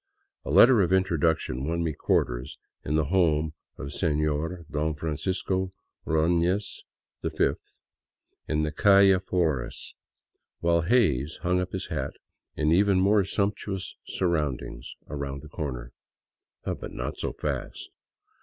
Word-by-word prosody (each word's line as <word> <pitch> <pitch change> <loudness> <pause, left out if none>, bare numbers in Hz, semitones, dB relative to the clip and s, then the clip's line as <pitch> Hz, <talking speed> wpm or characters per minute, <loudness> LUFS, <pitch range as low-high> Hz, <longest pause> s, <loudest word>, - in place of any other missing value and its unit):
A - - -7
letter 110 - +7
of 90 -2 +1
introduction 80 -8 +1
won 85 +1 0
me 80 -2 -1
quarters - - -1 0.3
in 75 - -1
the 80 -1 +2
home 80 -4 +2 0.2
of 70 - -6
Seiior 75 +3 -1
Don 75 +1 -1
Francisco 95 +5 -2 0.3
Ordofiez 85 +5 +1 0.4
V, - - +1 1.0
in 75 0 0
the 75 - -1
calle 100 0 +5
Flores, 85 -9 -2 0.7
while 85 0 +2
Hays 80 - +2
hung 90 +1 +2
up 90 0 -4
his 95 - -4
hat - - -3 0.4
in 75 0 +1
even 95 +2 +4
more 100 +2 +4
sumptuous 100 0 -2
surroundings 75 -8 -2
around 70 -1 -5
the 75 - -11
corner. 65 -6 -5 0.7
But - - -4
not - - -5
so - - -2
fast - - -4
80 Hz, 125 wpm, -27 LUFS, 75-95 Hz, 1.0 s, letter